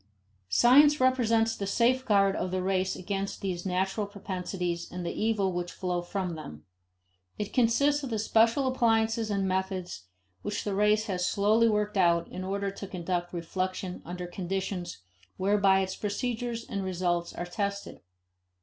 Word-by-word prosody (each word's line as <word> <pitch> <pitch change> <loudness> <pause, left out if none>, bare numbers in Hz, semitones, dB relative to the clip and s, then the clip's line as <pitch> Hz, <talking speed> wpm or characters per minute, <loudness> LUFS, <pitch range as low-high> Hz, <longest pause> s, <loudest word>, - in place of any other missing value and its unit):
Science 290 - +6
represents 230 -3 +3
the 200 - -4
safeguard 215 -3 +3
of 180 - -2
the 185 0 -2
race 190 0 0
against 195 +1 -3
these 185 -1 -3
natural 190 +3 -1
propensities 180 -3 -4
and 180 0 -5
the - - -2
evils 210 -4 0
which 175 0 -3
flow 180 -2 -2
from 180 0 -3
them. 80 - -9 0.7
It 210 - -4
consists 280 +5 +3
of 270 - -5
the 225 - -1
special 225 +5 +3
appliances 225 -3 +2
and 200 -2 0
methods 185 - -3 0.4
which 205 0 -3
the 205 - -2
race 210 +2 +3
has 180 -3 -1
slowly 215 +3 +3
worked 210 0 0
out 170 -2 +3
in 185 - -6
order 200 +1 -2
to 200 0 -8
conduct 175 -1 -3
reflection 185 +2 -3
under 180 +1 -6
conditions 180 - -4 0.3
whereby 195 0 +3
its 190 0 -3
procedures 230 +2 -3
and 200 - -3
results 175 -2 -1
are 175 - -4
tested. 200 +2 -4
195 Hz, 150 wpm, -28 LUFS, 180-220 Hz, 0.7 s, Science